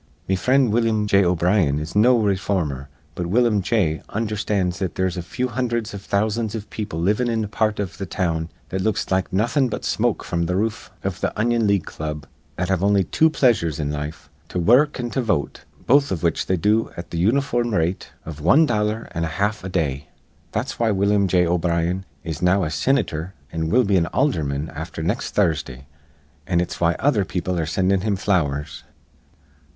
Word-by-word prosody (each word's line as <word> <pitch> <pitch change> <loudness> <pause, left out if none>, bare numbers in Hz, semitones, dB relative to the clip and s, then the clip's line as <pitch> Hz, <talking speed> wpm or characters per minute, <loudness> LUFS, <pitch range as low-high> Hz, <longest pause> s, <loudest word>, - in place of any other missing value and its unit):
Me 95 - +2
frind 130 +4 +3
Willum 115 -2 +2
J. 100 -1 +4
O'Brien 90 -3 +2
is 75 +4 -5
no 120 +4 +5
rayformer. 95 - -1 0.3
But 85 +1 -3
Willum 110 +1 +3
J. 90 -6 0
undherstands 105 -4 -1
that 95 -3 -3
there's 95 -1 0
a 90 - -3
few 125 +9 -3
hundherds 120 -2 -2
iv 100 - -6
thousands 110 +2 -1
iv 110 -2 -7
people 100 -7 -4
livin' 105 +8 +1
in 115 -1 0
a - - -3
part 105 +1 0
iv 100 -3 -4
th' 95 -2 -5
town 85 -3 -1 0.2
that 95 - -2
looks 110 -1 -1
like 95 -1 +1
nawthin' 120 +7 +1
but - - -4
smoke - - 0
fr'm 85 -1 -1
th' 90 - -1
roof 110 +3 -2
iv - - -3
th' - - -1
Onion 115 0 +1
League 100 -4 +2
Club 75 -2 -5 0.3
that 90 - -2
have 95 -1 +1
on'y 100 -1 +4
two 160 - +4
pleasures 115 - +2
in 75 -1 -1
life, 75 +1 -5 0.2
to - - -4
wur 110 +9 +6
ruk 145 - -11
an' 120 -1 -3
to 135 - 0
vote, 105 - -2 0.2
both 140 +2 +4
iv 90 -2 -2
which 85 -2 0
they 95 - +1
do 105 +5 +2
at 85 - -8
th' 85 - -3
uniform 120 +4 +1
rate 85 +3 -1 0.2
iv 75 -2 -8
wan 95 - +5
dollar 110 -2 -1
an' 85 - -2
a - - 0
half 105 0 0
a 95 - -4
day. 70 -6 -2 0.4
That's 110 +5 -3
why 115 -1 +2
Willum 100 0 +2
J. 90 -1 +3
O'Brien 85 +1 0 0.2
is 80 -3 -5
now 90 +2 +3
a 80 - -2
sinitor 85 - 0 0.2
an' 80 -1 -2
will 125 +6 +4
be 100 -3 +2
an 85 -2 +2
aldherman 75 - 0
afther 80 +1 -5
next 105 - -2
Thursdah, 75 -9 0 0.6
an' 85 -2 +2
it's 85 - -3
why 85 0 +3
other 125 -8 +2
people 90 0 -2
are 80 - -1
sinding 95 +3 +1
him 105 0 0
flowers. 75 -7 -1
95 Hz, 200 wpm, -22 LUFS, 85-110 Hz, 0.6 s, wur